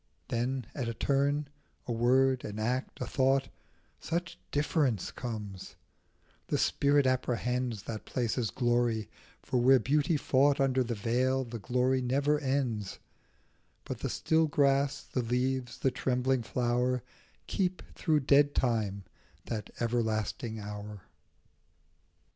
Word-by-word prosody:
Then 125 +2 -1
at 125 -5 -3
a 115 - -4
turn, 140 +3 +1 0.4
a - - -4
word, 130 +2 +3
an 105 0 -5
act, 125 +4 -2
a - - -2
thought, 135 0 +2 0.5
Such 175 +2 -3
difference 145 - 0
comes; 105 -6 -6 0.7
the - - 0
spirit 145 0 +3
apprehends 125 -3 0
That 110 -2 -6
place's 120 -2 -1
glory; 120 0 0 0.3
for 125 - 0
where 130 +2 +7
beauty 150 +4 +2
fought 140 +1 +3
Under 130 -1 +2
the 120 -1 -3
veil 125 +5 +1
the 120 -2 -7
glory 125 +3 +1
never 140 +4 +1
ends; 130 -8 -1 0.9
But - - -5
the - - -2
still 160 0 +2
grass, 140 -1 +2
the 130 - -2
leaves, 125 +1 -1
the 135 - +1
trembling 130 0 0
flower 125 +1 0 0.4
Keep, 185 -2 -1
through 155 -3 +1
dead 145 +2 +4
time, 110 -5 0 0.4
that 110 -3 -4
everlasting 110 -1 -1
hour. 105 -1 -7
125 Hz, 125 wpm, -30 LUFS, 115-135 Hz, 0.9 s, where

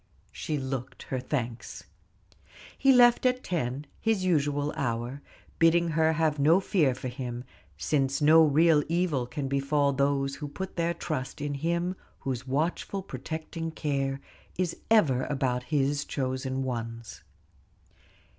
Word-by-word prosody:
She 155 - -3
looked 130 -2 -5
her 130 - -1
thanks. 125 -3 -4 0.9
He 270 - +4
left 240 -2 +6
at 255 0 +1
ten, 145 -5 -2
his 220 -4 0
usual 145 -4 +1
hour, 120 +2 -2 0.4
bidding 170 +1 +4
her 160 0 +2
have 155 -2 +1
no 160 +6 +5
fear 155 -9 +2
for 130 - -6
him, 125 -1 -5 0.3
since 135 -2 0
no 160 +2 +7
real 155 0 +4
evil 165 -7 0
can 140 +1 -4
befall 140 +1 +1
those 140 0 0
who 150 - -5
put 190 +6 -6
their 170 -1 0
trust 130 -5 -4
in 145 0 -2
Him 170 +5 -1 0.3
whose 130 -1 -4
watchful, 165 +7 -1
protecting 160 +3 -5
care 140 -3 -2 0.4
is 180 -2 -1
ever 150 - +4
about 130 -3 -1
His 140 -1 +1
chosen 130 -1 -2
ones. 115 -2 -5
145 Hz, 135 wpm, -28 LUFS, 130-165 Hz, 0.9 s, no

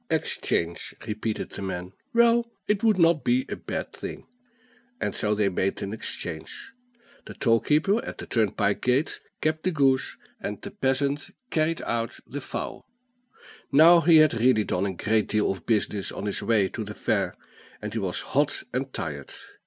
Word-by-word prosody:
"Exchange," 85 0 -1
repeated 110 0 -3
the - - -7
man; 90 -1 -4 0.2
"well, 235 -1 +4 0.2
it 210 0 +1
would 220 -3 +4
not 165 -3 +4
be 255 +2 +2
a - - -2
bad - - -5
thing." - - -7 0.7
And - - -2
so 105 -1 +1
they 105 -1 +2
made 95 0 -1
an 100 +1 -4
exchange, 110 - -6 0.5
the - - -8
toll 115 -3 +3
keeper 195 - +2
at - - -6
the - - -7
turnpike 105 -2 +1
gate 130 +5 +1 0.2
kept 155 0 +1
the 185 - +1
goose, 135 -5 +2 0.2
and - - -4
the - - -8
peasant 140 +2 0 0.2
carried 160 +1 +1
off 115 0 -2
the 145 +2 -6
fowl. - - -5 0.9
Now 165 +4 +8
he 165 -1 +6
had 155 -1 +6
really 115 -1 +3
done 95 0 0
a 95 - -3
great 110 +4 +1
deal 105 -2 +1
of 95 - -7
business 105 -3 0
on - - -5
his 100 - -2
way 110 -4 +3
to 110 - -4
the 105 0 -7
fair, - - 0 0.4
and 105 0 -5
he 115 - -1
was 95 -3 -2
hot 145 +1 0
and 130 +1 -2
tired. 70 - -5
120 Hz, 175 wpm, -26 LUFS, 105-155 Hz, 0.9 s, Now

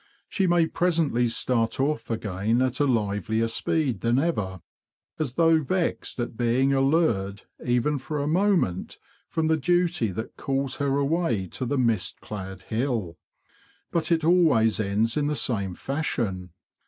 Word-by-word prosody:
She 190 -2 0
may 175 -1 +4
presently 160 -8 +1
start 115 0 0
off 135 -3 -1
again 110 0 -1
at 130 0 -1
a 145 - +3
livelier 110 -1 0
speed 125 - -1
than 120 +1 +2
ever, 105 - -1 0.6
as 145 -6 -2
though 165 +1 +4
vexed 170 -2 -2
at 120 -1 -3
being 125 +4 +2
allured, 135 -9 +1 0.2
even 125 +4 +1
for 150 +4 -4
a 140 - -1
moment, 170 - +1 0.3
from 160 - -1
the 160 0 +3
duty 170 - +1
that 110 +5 -6
calls 135 -1 -2
her 140 -1 0
away 140 - 0
to 125 - -4
the 145 - 0
mist 115 -6 0
clad 95 -2 -7
hill. 110 - -2 0.7
But 170 0 0
it 165 -1 +2
always 155 -11 +4
ends 110 +3 0
in 145 -1 +1
the 150 - 0
same 100 -10 0
fashion. 115 - -3
130 Hz, 150 wpm, -25 LUFS, 110-155 Hz, 0.7 s, may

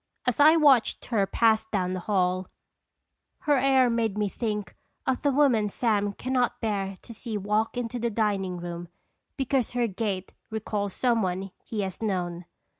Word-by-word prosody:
As 250 +1 0
I 305 +3 +8
watched 285 -7 +4
her 205 -5 +1
pass 220 0 +3
down 185 -4 -1
the 185 - -2
hall, 185 -1 0 0.9
her 290 -3 +3
air 265 -1 +4
made 230 -3 0
me 210 -1 +1
think 210 -3 -3 0.3
of 260 - 0
the 285 - +2
woman 255 -7 +3
Sam 205 -2 0
can 255 +5 -4
not 250 -1 +1
bear 195 -4 -2
to 230 - -10
see 225 -1 -5
walk 210 +4 0
into 245 0 -3
the 235 0 0
dining 200 -4 0
room, 175 0 -6 0.5
because 265 -3 0
her 245 -1 +1
gait 195 -3 -3 0.2
recalls 210 -2 -3
some 240 -3 +2
one 190 0 -2
he 215 -2 -3
has 190 0 -5
known. 180 -4 -2
215 Hz, 170 wpm, -27 LUFS, 195-245 Hz, 0.9 s, I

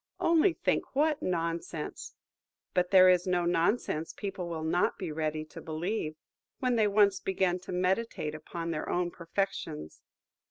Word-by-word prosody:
Only 335 +2 +4
think - - -1
what 300 +1 +2
nonsense! 165 -2 -3 0.6
But 180 0 +2
there 185 -1 +8
is 180 0 +4
no 180 -1 +1
nonsense 170 -1 0
people 195 -4 -5
will 160 -2 -4
not 170 +3 +1
be 180 -4 -4
ready 155 0 -2
to - - -11
believe, 160 +1 -3 0.4
when 255 -2 +1
they 220 -2 +4
once 200 -1 +4
begin 185 -1 0
to 180 - -9
meditate 185 -3 0
upon 165 +2 -5
their 155 - -3
own 175 0 0
perfections. 165 - -4
180 Hz, 150 wpm, -30 LUFS, 165-200 Hz, 0.6 s, there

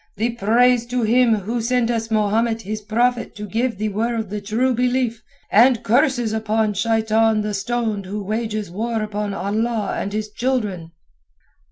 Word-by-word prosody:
"The 225 +4 0
praise 235 +2 +3
to 245 0 -1
Him 235 +1 +4
who 220 +4 -3
sent 240 0 +1
us 225 -1 -2
Mahomet 225 +1 +1
His 215 +2 -4
Prophet 235 +3 0
to 210 - -6
give 230 +3 -1
the 215 +1 -1
world 220 0 -2
the 210 0 -3
True 230 +6 0
Belief, 245 -1 0 0.3
and 235 +3 +5
curses 245 -1 +2
upon 220 -1 0
Shaitan 220 +1 +2
the 210 0 -3
stoned 215 -1 -2
who 205 +2 -4
wages 215 -2 -3
war 225 +3 -2
upon 210 -1 -3
Allah 215 +2 -1
and 200 - -3
His 215 0 -3
children." 210 -9 -2
220 Hz, 160 wpm, -21 LUFS, 210-235 Hz, 0.3 s, and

